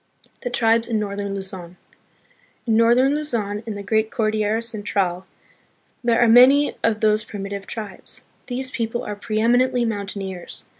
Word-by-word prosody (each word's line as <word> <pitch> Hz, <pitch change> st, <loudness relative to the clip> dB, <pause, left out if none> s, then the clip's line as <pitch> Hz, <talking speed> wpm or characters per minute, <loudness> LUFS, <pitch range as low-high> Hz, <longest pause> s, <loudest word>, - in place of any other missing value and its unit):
The 245 Hz, -, -3 dB
Tribes 230 Hz, -1 st, +2 dB
in 230 Hz, -2 st, 0 dB
Northern 200 Hz, -1 st, -3 dB
Luzon. 185 Hz, -2 st, -8 dB, 0.9 s
In 225 Hz, -2 st, +2 dB
northern 240 Hz, +4 st, +4 dB
Luzon, 230 Hz, -9 st, -2 dB
in 215 Hz, -, -4 dB
the 205 Hz, -, -6 dB
great 220 Hz, +1 st, +1 dB
Cordillera 215 Hz, -1 st, 0 dB
Central, 195 Hz, -5 st, -2 dB, 0.8 s
there 235 Hz, -1 st, +3 dB
are 240 Hz, -, +5 dB
many 260 Hz, +5 st, +6 dB
of 220 Hz, -1 st, +1 dB
these 215 Hz, 0 st, +3 dB
primi 200 Hz, -2 st, -7 dB
tive 200 Hz, -1 st, -6 dB
tribes. 210 Hz, -4 st, -5 dB, 0.2 s
These 255 Hz, +1 st, -3 dB
people 230 Hz, 0 st, -2 dB
are 210 Hz, -, -4 dB
preeminently 240 Hz, +4 st, +1 dB
mountaineers. 200 Hz, -4 st, -5 dB
220 Hz, 145 wpm, -22 LUFS, 200-235 Hz, 0.9 s, many